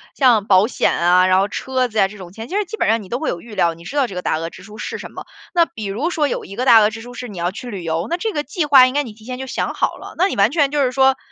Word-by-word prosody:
像 235 -7 +3
保 190 +1 +5
险 245 - 0
啊， 180 +2 +4
然 185 0 +4
后 200 - -1
车 255 +1 -1
子 220 - -7
呀 195 -2 +4
这 210 +1 -12
种 180 -2 -10
钱， 225 +4 -9
其 380 - -6
实 420 - +2
基 440 +4 -8
本 - - 0
上 225 -1 +1
你 185 - -14
都 245 - -2
会 315 - -3
有 170 - -2
预 230 -2 -12
料， 170 -4 +1
你 165 +1 -15
知 280 +11 -6
道 270 -3 +3
这 190 - -9
个 180 - -3
大 155 - 0
额 165 +1 -4
支 185 - -14
出 210 +1 -12
是 - - -5
什 - - -9
么。 - - -9 0.3
那 340 -1 +4
比 220 - -9
如 230 - -2
说 300 -5 0
有 - - -4
一 195 - -10
个 250 - -2
大 230 -3 +8
额 210 0 +4
支 220 +1 -8
出 245 +1 -10
是 245 +1 -7
你 200 -4 -10
要 175 +1 -1
去 245 +4 -8
旅 195 -5 -6
游， 165 +3 -2
那 340 - 0
这 440 +5 -2
个 295 -4 -2
计 300 +3 -2
划 265 -3 +7
应 255 - -4
该 290 0 +1
你 235 - -8
提 215 +1 -17
前 250 0 -5
就 265 - -6
想 260 - -3
好 - - -1
了， - - -10
那 370 +3 +3
你 - - -4
完 200 +3 +4
全 290 -2 +1
就 295 -1 +1
是 255 -1 +1
说， 265 0 +4
230 Hz, 385 characters per minute, -19 LUFS, 195-270 Hz, 0.3 s, 大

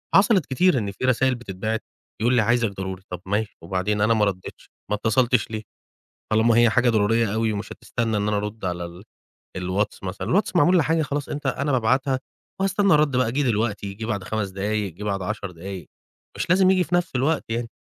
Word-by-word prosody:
حصلت 195 - +5
كتير 165 +3 +3
إن 105 -4 -2
في 100 - -4
رسايل 130 +1 +2
بتتبعت 110 -1 -4 0.4
يقول 120 +3 +3
لي: 120 - +5
"عايزك 120 +1 +2
ضروري." 95 -1 -6
طب 90 -1 -6
ماشي، 105 +2 -2
وبعدين 95 +4 -1
أنا 110 +2 +4
ما 110 -2 +3
رديتش، 95 -2 -5 0.2
ما 105 - +1
اتصلتش 115 +1 +1
ليه؟ 110 -1 -4 0.7
طالما 110 +1 +4
هي 120 0 +6
حاجة 120 +3 +3
ضرورية 110 0 +2
أوي 110 -1 +1
مش 105 +1 -5
هتستنى 115 -3 -2
إن 105 0 0
أنا 105 -1 +1
أرد 105 0 -4
على 90 -1 -2
ال 85 +3 -11 0.5
الواتس 95 +3 -2
مثلًا، 95 0 -4
الواتس 190 - +1
معمول 175 +2 +5
لحاجة 160 0 +2
خلاص، 145 0 -3
أنت 145 0 -5
أنا 140 +2 0
بابعتها 130 +2 +1 0.4
وهاستنى 195 0 +3
الرد 150 -3 +3
بقى، 130 -3 +2
جاي 145 +3 0
دلوقتي، 105 -4 -1
جه 110 +3 -6
بعد 105 -4 -2
5 110 -1 -2
دقايق، 100 0 -2
جه 100 - -9
بعد 100 -2 -1
10 100 -1 -4
دقايق، 90 -1 -8 0.5
مش - - -3
لازم 185 +1 +5
ييجي 185 -1 +3
في 175 - -1
نفس 175 -5 -1
الوقت 145 +5 +1
يعني. 115 +1 -2
110 Hz, 200 wpm, -23 LUFS, 100-130 Hz, 0.7 s, هي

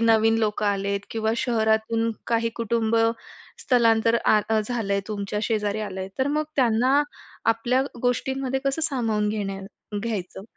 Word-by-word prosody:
नवीन 225 0 +4
लोकं 210 -1 0
आलेत 200 0 0
किंवा 220 -1 0
शहरातून 225 -1 +1 0.2
काही 230 0 +1
कुटुंब 230 -1 0 0.6
स्थलांतर 230 -2 +3
आ 215 - +5
अ 220 -1 +3
झालंय 210 -3 -1
तुमच्या 205 -1 -3
शेजारी 210 -1 0
आलंय, 190 -2 -4
तर 265 - +2
मग 305 - +1
त्यांना 255 +3 +3 0.5
आपल्या 240 +3 +1 0.2
गोष्टींमध्ये 265 +2 0
कसं 275 +4 0
सामावून 225 -8 0
घेण्या 200 -2 -3 0.4
घ्यायचं? 200 -4 -4
225 Hz, 130 wpm, -24 LUFS, 210-235 Hz, 0.6 s, आ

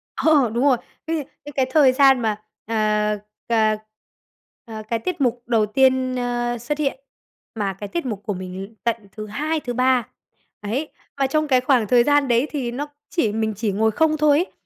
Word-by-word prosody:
Ờ, 290 -7 +3
đúng 240 +3 0
rồi, 270 -4 +4 0.3
cái 325 - 0
gì? - - -2 0.2
Những 290 - -8
cái 265 -2 +2
thời 275 -2 +5
gian 270 -1 +5
mà, 215 -2 -1 0.2
à, 210 -1 +1 0.3
cà, 220 -2 +3 0.9
à, 220 -1 -7
cái 230 -1 0
tiết 335 +3 -4
mục 245 -1 0
đầu 225 -3 +2
tiên, 260 +3 +2
a, 240 0 -1
xuất 290 +6 -3
hiện, 275 -3 -1 0.6
mà 200 -3 -1
cái 205 +2 -7
tiết 340 -4 -3
mục 210 -4 -4
của 205 - -2
mình 185 0 -6
l - - -5 0.2
tận 235 -1 +1 0.2
thứ 215 +1 -7
2, 305 +8 -2
thứ 245 -4 -5
3, 255 -1 +2 0.5
ấy. 245 +9 -3 0.3
Mà 270 -1 +2
trong 305 +2 0
cái 255 -3 +3
khoảng 250 -5 +2
thời 240 +1 +5
gian 290 0 +3
đấy 240 +4 +2
thì 260 -6 -2
nó 285 +4 -4 0.2
chỉ 235 - +1
mình 220 0 -1
chỉ 210 0 -1
ngồi 220 +3 +2
không 310 +5 +2
thôi 295 -1 +4
ấy 355 - -1
245 Hz, 205 wpm, -22 LUFS, 220-280 Hz, 0.9 s, thời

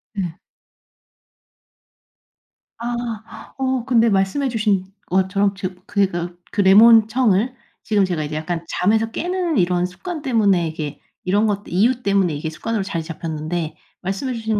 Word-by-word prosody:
네. 175 -4 -3 2.4
아. 235 -2 -6
어 260 -2 -1
근데 235 -3 +4
말씀해 195 +8 +1
주신 210 -5 +1 0.2
것처럼 195 +2 +1
저 185 -1 -3 0.2
그러니까 175 -3 0 0.2
그 205 - +1
레몬 220 +3 +7
청을 230 0 +2 0.3
지금 205 -3 +2
제가 170 -4 -2
이제 150 +1 -5
약간 165 +2 -3
잠에서 220 +4 +1
깨는 355 +1 -1
이런 180 -1 +2
습관 315 - -6
때문에 205 - +2
이게 155 -2 -5 0.2
이런 205 +4 +2
것들 205 -1 -3
이유 235 +7 +2
때문에 195 -5 +2
이게 155 +2 -3
습관으로 220 +6 -3
자리 170 -4 -3
잡혔는데 160 0 -4 0.3
말씀해 195 +8 -3
주신 220 -2 -1
200 Hz, 290 characters per minute, -21 LUFS, 180-230 Hz, 2.4 s, 레몬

